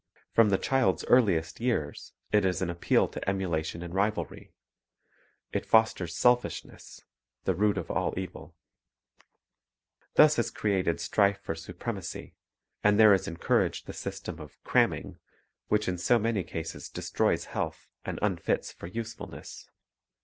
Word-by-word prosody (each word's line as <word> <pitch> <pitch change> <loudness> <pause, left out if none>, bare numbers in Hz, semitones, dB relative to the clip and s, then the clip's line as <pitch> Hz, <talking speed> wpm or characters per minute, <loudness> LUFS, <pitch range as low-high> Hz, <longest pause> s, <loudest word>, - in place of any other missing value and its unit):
From 115 -2 +5
the 95 - +3
child's 100 -11 +1
earliest 85 -10 +3
years 115 -12 -2 0.2
it 105 - +4
is 90 -2 +1
an 90 -2 -1
appeal 85 - +2
to - - -6
emula 95 -5 0
tion 85 +2 -6
and 85 0 -7
rivalry; 100 -4 -2 1.0
it - - -1
fosters 110 -6 +2
selfishness, 125 0 0 0.4
the 95 - +1
root 105 +3 +2
of - - -3
all 90 -2 -1
evil. 95 0 -7 1.6
Thus 150 -3 +6
is 115 - +1
created 95 -5 0
strife 100 -1 +2
for - - -2
supremacy; 90 +4 -6 0.5
and 105 0 +4
there 110 -2 +8
is 95 -1 +1
encouraged 85 - 0
the - - -7
system 95 -3 -6
of 75 -2 -11
"cramming," - - +1 0.5
which 105 0 +1
in 90 -1 -1
so 120 +7 +4
many 115 -3 0
cases 80 -1 -6
destroys - - 0
health - - -3 0.2
and - - -4
unfits 95 -6 0
for - - -9
usefulness. 110 +4 -8
95 Hz, 140 wpm, -29 LUFS, 85-110 Hz, 1.6 s, there